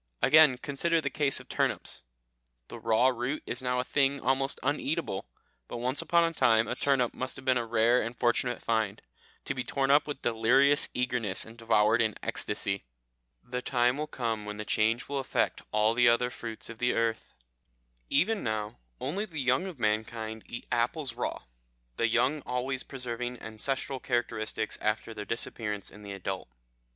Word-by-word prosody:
Again, 150 -2 +7
consider 155 +5 0
the 140 -3 -2
case 140 -1 +4
of - - -13
turnips; - - -1 0.7
the - - -8
raw 115 +3 +4
root 125 +4 -2
is 125 - -2
now 125 -1 0
a - - +1
thing 140 +1 +2
almost 135 +2 0
uneatable, 145 - -1 0.4
but - - -6
once 125 +3 -1
upon 170 0 +3
a 165 0 0
time 115 -6 +4
a - - -1
turnip 130 -2 +1
must 130 0 -4
have 130 - -10
been 130 - +4
a 115 - -4
rare 115 +2 +3
and 115 +2 -5
fortunate 120 0 +1
find, 110 -3 0 0.4
to - - -1
be 130 -1 -3
torn 135 +1 0
up 145 +2 +5
with 145 -2 -5
delirious 130 +6 +3
eagerness 125 -6 -1
and 115 - -12
devoured 115 -1 +3
in 110 -2 +1
ecstasy. 95 0 -2 0.6
The 125 0 -4
time 125 -1 +2
will 150 +1 -3
come 115 -6 -2
when 105 0 -6
the 105 - -5
change 110 +4 +1
will 140 0 -2
affect 135 - 0
all 110 +1 +3
the 120 0 +5
other 125 +1 +2
fruits 115 -3 -7
of 115 -1 -9
the 125 0 +2
earth. 115 -1 -1 0.7
Even 215 +3 +2
now, 110 - -3 0.2
only 180 +11 -2
the 170 -7 -10
young 130 +7 +2
of 180 -6 -7
mankind 110 0 -1
eat 120 - -7
apples 120 +3 0
raw 120 - -3 0.5
the 115 - +2
young 130 +6 +2
always 125 +1 -1
preserving 125 -2 -5
ancestral 130 +4 -3
characteristics 110 -3 -1
after 110 +1 -1
their 105 -1 -6
disappearance 105 -3 -3
in 105 - -13
the 100 -1 -8
adult. 95 -5 -4
125 Hz, 175 wpm, -29 LUFS, 110-135 Hz, 0.7 s, Again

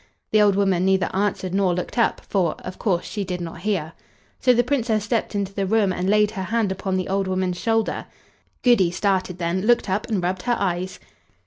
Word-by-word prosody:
The 215 - +5
old 205 -2 +4
woman 195 -3 +2
neither 190 0 +1
answered 190 -2 -1
nor 190 -3 +2
looked 180 - -4
up, 235 - +1
for, 180 -6 +1
of 185 - -7
course, 180 -5 0
she 205 - -3
did 180 -1 -4
not 170 -1 -6
hear. 180 -5 -1 0.5
So 255 - +4
the 245 0 +4
Princess 235 -5 0
stepped 220 -1 -1
into 200 -1 -2
the 195 -1 -1
room 205 -2 +2
and 185 +1 -1
laid 210 0 +3
her 190 -3 -4
hand 220 -1 0
upon 190 0 -2
the 185 - -2
old 195 0 0
woman's 185 -1 -1
shoulder. 225 -1 0 0.6
Goody 235 -8 +5
started 185 0 0
then, 175 +1 -1
looked 220 -2 +2
up, 205 +3 -1
and 205 -6 -1
rubbed 180 +1 -1
her 240 +3 0
eyes. 185 -1 -2
195 Hz, 210 wpm, -23 LUFS, 185-215 Hz, 0.6 s, The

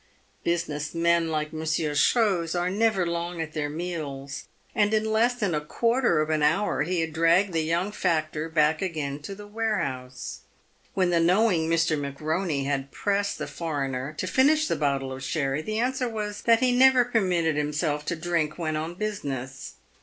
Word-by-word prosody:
Business 160 -3 -2
men 170 0 +3
like 155 -1 -2
Monsieur 155 -1 -1
Chose 180 0 +2
are 175 +1 0
never 205 -2 +2
long 170 0 -3
at 160 -1 -4
their 150 -2 -2
meals, 150 -4 -5 0.3
and 210 +1 +2
in 215 0 +1
less 235 +3 +3
than 205 -8 -1
a 150 - 0
quarter 230 +2 +1
of 155 +1 -1
an 155 -1 +1
hour, 160 +7 +2
he 175 +2 0
had 160 -1 -3
dragged 170 +4 +3
the 165 - +1
young 170 +5 0
factor 160 -4 -1
back 155 -1 +2
again 150 -6 -3
to 195 +7 -7
the 205 +1 -10
warehouse. 140 - -3 0.6
When 185 -2 +2
the 170 - +3
knowing 175 -1 +3
Mr. 165 -1 +2
McBoney 150 +2 -2
had 140 -1 -2
pressed 200 +3 -1
the - - -4
foreigner 140 -4 -3
to - - -2
finish 295 - +3
the - - 0
bottle 135 -2 -1
of 130 0 -8
sherry, 135 0 -1
the 215 +6 -3
answer 250 +1 0
was 210 -2 -4
that 230 -1 +5
he 255 -1 +3
never 255 0 +6
permitted 180 -9 +1
himself 150 0 -1
to 170 - -1
drink 165 -2 -1
when 160 -3 -2
on 160 +3 -3
business. 135 -11 -5
165 Hz, 175 wpm, -26 LUFS, 150-200 Hz, 0.6 s, never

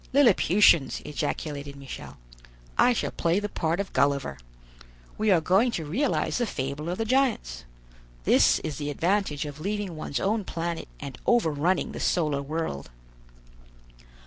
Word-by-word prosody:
"Lilliputians!" 200 - +5
ejaculated 145 -1 -4
Michel; 140 -1 -9 0.6
"I 250 - +5
shall 240 - -1
play 170 +3 +1
the 205 - -3
part 165 -3 -1
of 200 - -4
Gulliver. 140 - +1 0.8
We 215 0 0
are 185 -4 +5
going 190 +9 +3
to 160 - -3
realize 245 - 0
the 240 - 0
fable 140 +1 -4
of 180 - -2
the 225 - -1
giants. 230 - 0 0.6
This - - +5
is 150 -4 -4
the 145 0 -3
advantage 165 -1 0
of 145 0 -8
leaving 200 0 -3
one's 155 -2 -3
own 210 +2 0
planet 170 -1 -4
and 140 -2 -8
over 235 -10 +3
running 170 +6 0
the - - -7
solar 150 -5 +1
world." 140 - -4
165 Hz, 145 wpm, -26 LUFS, 145-205 Hz, 0.8 s, Lilliputians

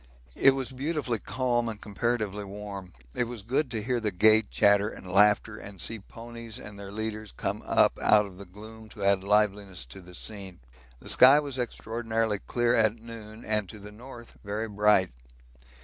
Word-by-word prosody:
It 135 -1 +5
was 135 -1 -3
beautifully 135 -3 -2
calm 120 +2 -1
and 110 -2 -5
comparatively 105 -1 -2
warm. 100 -2 -8 0.2
It 125 - 0
was 120 -3 -7
good 130 +5 0
to 110 -3 -3
hear 125 +1 0
the 110 -2 -1
gay 110 +4 +5
chatter 100 - +3
and 95 - -11
laughter, 105 +3 +3
and 100 -2 -10
see 115 +6 -3
ponies 115 +2 -8
and 105 -4 -10
their 100 -1 -8
leaders 110 0 -5
come - - -3
up - - +3
out 105 -1 +5
of 95 -2 -12
the 100 - -8
gloom 110 +3 -12
to 105 -2 -8
add 100 -1 +3
liveliness 100 -6 +1
to 95 - -11
the 90 0 -13
scene. 95 -2 -7 0.4
The - - -14
sky 135 +3 +8
was 140 -3 -4
extraordinarily 115 -2 -2
clear 120 +2 0
at 110 -1 +3
noon 110 -1 -11
and 105 -3 0
to 105 - -9
the 105 0 -11
north 120 +2 -12
very 105 +2 -3
bright. 105 -3 +3
110 Hz, 180 wpm, -28 LUFS, 100-115 Hz, 0.4 s, sky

